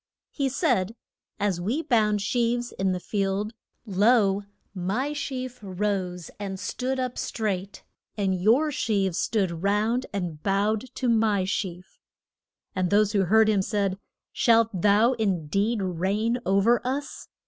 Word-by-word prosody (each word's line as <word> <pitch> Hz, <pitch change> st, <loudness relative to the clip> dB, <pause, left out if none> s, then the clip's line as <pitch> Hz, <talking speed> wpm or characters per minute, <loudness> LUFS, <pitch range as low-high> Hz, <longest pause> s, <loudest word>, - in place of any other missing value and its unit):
He 275 Hz, -2 st, -1 dB
said, 230 Hz, -, 0 dB, 0.4 s
As 195 Hz, -4 st, 0 dB
we 245 Hz, -, -1 dB
bound 210 Hz, -5 st, +2 dB
sheaves 240 Hz, +1 st, 0 dB
in 190 Hz, 0 st, -1 dB
the 180 Hz, -, -1 dB
field, 200 Hz, +3 st, -2 dB, 0.3 s
lo, 205 Hz, -1 st, +3 dB, 0.3 s
my 205 Hz, +10 st, -2 dB
sheaf 255 Hz, -3 st, -4 dB
rose 185 Hz, -3 st, -3 dB
and 195 Hz, -2 st, -5 dB
stood 255 Hz, +7 st, -2 dB
up 255 Hz, -1 st, -3 dB
straight. 200 Hz, -3 st, -3 dB, 0.3 s
And 195 Hz, -2 st, +1 dB
your 255 Hz, +10 st, +4 dB
sheaves 200 Hz, -, 0 dB
stood 185 Hz, -7 st, 0 dB
round, 215 Hz, +6 st, +1 dB
and 175 Hz, -6 st, -4 dB
bowed 205 Hz, +4 st, +1 dB
to 255 Hz, -, -1 dB
my 220 Hz, -4 st, +2 dB
sheaf. 185 Hz, -2 st, -4 dB, 0.8 s
And 185 Hz, -1 st, 0 dB
those 205 Hz, +1 st, +3 dB
who 200 Hz, -3 st, +2 dB
heard 220 Hz, +4 st, +5 dB
him 210 Hz, -3 st, +3 dB
said, 195 Hz, -1 st, -1 dB, 0.3 s
Shalt 230 Hz, -1 st, +4 dB
thou 210 Hz, +5 st, +4 dB
in 195 Hz, -9 st, -1 dB
deed 200 Hz, +7 st, 0 dB
reign 195 Hz, +7 st, 0 dB
o'er 200 Hz, +5 st, +3 dB
us? 275 Hz, +3 st, -4 dB
205 Hz, 135 wpm, -26 LUFS, 190-235 Hz, 0.8 s, heard